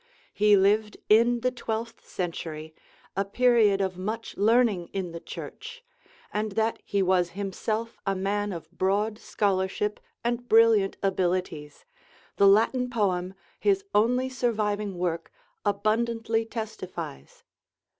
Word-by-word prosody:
He 210 0 +5
lived 210 +2 +2
in 235 +2 +5
the 255 +1 +1
twelfth 230 -2 -5
century, 160 -3 -5 0.4
a 195 - +1
period 215 -1 +3
of 190 -1 -2
much 220 +4 -4
learning 215 -4 +3
in 185 -3 -3
the 170 - -6
church; 470 - -9 0.5
and 210 -1 -2
that 220 +2 0
he 200 -1 0
was 180 -1 +2
himself 215 +3 -3
a 195 -1 0
man 205 +2 -1
of 165 -2 -8
broad 205 +4 0
scholarship 200 +1 -1 0.2
and 240 +1 -2
brilliant 225 -3 +5
abilities, 180 -5 -1 0.5
the 200 - +6
Latin 230 +5 +4
poem, 190 -6 0 0.2
his 395 -1 +2
only 250 +5 +3
surviving 210 -6 -1
work, 170 -2 -2 0.3
abundantly 225 +2 0
testifies. 185 - -7
205 Hz, 120 wpm, -27 LUFS, 190-230 Hz, 0.5 s, the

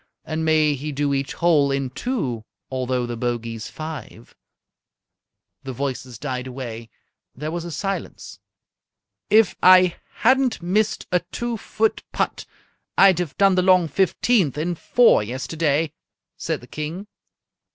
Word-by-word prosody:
And 160 0 -3
may 155 -2 +3
he 145 +2 -5
do 145 0 0
each 140 0 -2
hole 155 -5 +3
in 135 -2 -2
two, 140 - -3 0.3
Although 130 -1 -1
the 120 0 -4
bogey's 115 -2 -3
five!"_ 155 -7 -8 1.3
The 135 -1 -5
voices 130 -2 -4
died 130 -1 -4
away. 120 -3 -7 0.5
There 150 +4 -4
was 170 0 -4
a 170 - -6
silence. 195 +6 -5 0.9
"If 215 -2 +4
I 185 -1 +6 0.3
hadn't 260 0 +3
missed 200 +5 0
a 180 - +3
two 240 0 -3
foot 220 0 -1
putt, - - -2 0.5
I'd 190 -3 +6
have 175 -5 -4
done 195 -1 +5
the 185 - +3
long 185 -2 +4
fifteenth 185 - +1
in 170 +4 -1
four 240 - +4
yesterday," 145 +6 -1 0.4
said 160 -3 -3
the - - -12
King. 155 +8 -5
155 Hz, 135 wpm, -22 LUFS, 130-185 Hz, 1.3 s, I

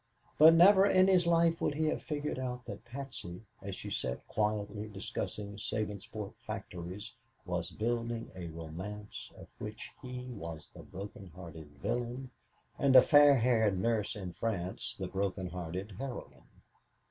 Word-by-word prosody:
But 160 +2 +10
never 190 +3 +8
in 185 -1 +6
his 180 -3 +5
life 170 0 +4
would 145 - +1
he 155 +1 +1
have 155 - 0
figured 150 -3 -3
out 125 -1 -4
that - - -7
Patsy, 115 -7 -6 0.2
as 100 -1 -5
she - - -7
sat 65 -1 -2
quietly 105 0 -1
discussing 100 0 -5
Sabinsport 105 -1 -4
factories, 90 +5 -6 0.3
was 90 -2 -2
building 115 +1 -2
a 90 -2 -5
romance 85 +6 -7
of - - -11
which 105 +1 -6
he 125 -1 -6
was 85 -10 -7
the - - -10
broken 100 0 -8
hearted 80 -4 -9
villain 120 - -2 0.5
and 135 -1 +4
a 130 - +13
fair 145 -1 +8
haired 115 -5 +3
nurse 115 0 +1
in 95 -4 -5
France 95 -5 -3
the 95 - -3
broken 95 0 -2
hearted 90 +3 -5
heroine. 135 -2 -7
105 Hz, 145 wpm, -33 LUFS, 95-130 Hz, 0.5 s, a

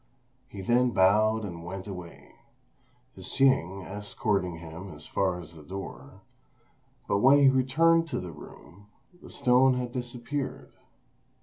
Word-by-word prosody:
He 100 - -8
then 120 +5 +3
bowed 110 +2 +3
and 85 -4 -7
went 95 +3 -7
away, 90 -4 -9 0.8
Hsing 100 -9 +1
escorting 100 -3 -2
him 85 +3 -9
as 75 -1 -10
far 90 -2 -1
as 85 -1 -11
the 80 - -13
door; 75 -5 -9 0.8
but 100 - +1
when 135 +6 +6
he 140 -1 +6
returned 165 +6 +3
to 155 - -3
the 90 - -7
room, 85 +5 -14 0.3
the - - -12
stone 130 -1 +3
had 125 -1 -3
disappeared. 125 +3 -5
100 Hz, 130 wpm, -28 LUFS, 90-125 Hz, 0.8 s, when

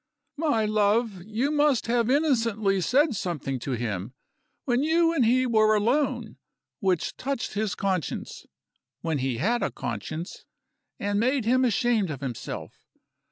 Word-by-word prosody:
"My 285 -8 +1
love, 210 -1 +1
you 235 +7 0
must 295 -5 +2
have 235 0 +1
innocently 230 -9 +2
said 265 - +3
something 160 -9 -3
to 130 +2 -3
him, 110 -1 -3 0.5
when 245 -1 +2
you 330 +2 +3
and 285 -6 +2
he 255 +3 +3
were 215 -3 +4
alone, 245 +8 0 0.4
which 190 - 0
touched 275 -2 -3
his 210 -1 -1
conscience 190 -6 -3 0.5
(when 160 -3 -1
he 130 -2 -1
had 230 - +1
a - - 0
conscience), 155 - -6 0.6
and 205 0 0
made 255 +1 +1
him 255 +3 +3
ashamed 235 -4 +2
of 140 -4 -5
himself. 130 -4 -5
220 Hz, 140 wpm, -26 LUFS, 180-255 Hz, 0.6 s, were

